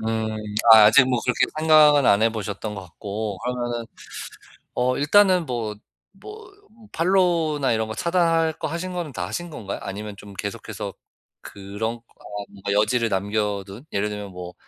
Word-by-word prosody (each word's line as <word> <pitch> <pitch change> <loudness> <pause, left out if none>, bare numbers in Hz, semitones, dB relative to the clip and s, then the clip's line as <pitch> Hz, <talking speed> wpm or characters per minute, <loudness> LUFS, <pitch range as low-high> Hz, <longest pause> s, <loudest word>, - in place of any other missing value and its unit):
음. 110 0 -1 0.4
아 110 -1 +10
아직 130 +5 +6
뭐 125 -2 +1
그렇게 125 - +2
생각은 155 -3 +6
안 100 +2 +4
해 115 - +4
보셨던 105 0 -5
것 100 - -6
같고 100 +3 -5
그러면은 120 -2 -3 0.9
어 125 +1 +1
일단은 185 +2 +4
뭐, 115 -4 -3 0.4
뭐 420 - -12 0.4
팔로우나 165 -6 +2
이런 110 0 0
거 110 - -5
차단할 165 +1 +2
거 160 - -3
하신 170 +4 -4
거는 175 -5 -4
다 90 -6 -4
하신 175 - -5
건가요? 105 -10 -6
아니면 100 +1 -6
좀 100 0 -12
계속해서 100 0 -6 0.5
그런 105 +4 -5
거 115 - -21 0.5
뭔가 100 0 -5
여지를 115 +3 +2
남겨둔 100 +2 -2
예를 100 +1 0
들면 105 -2 -6
뭐 90 0 -8
115 Hz, 305 characters per minute, -23 LUFS, 105-155 Hz, 0.9 s, 아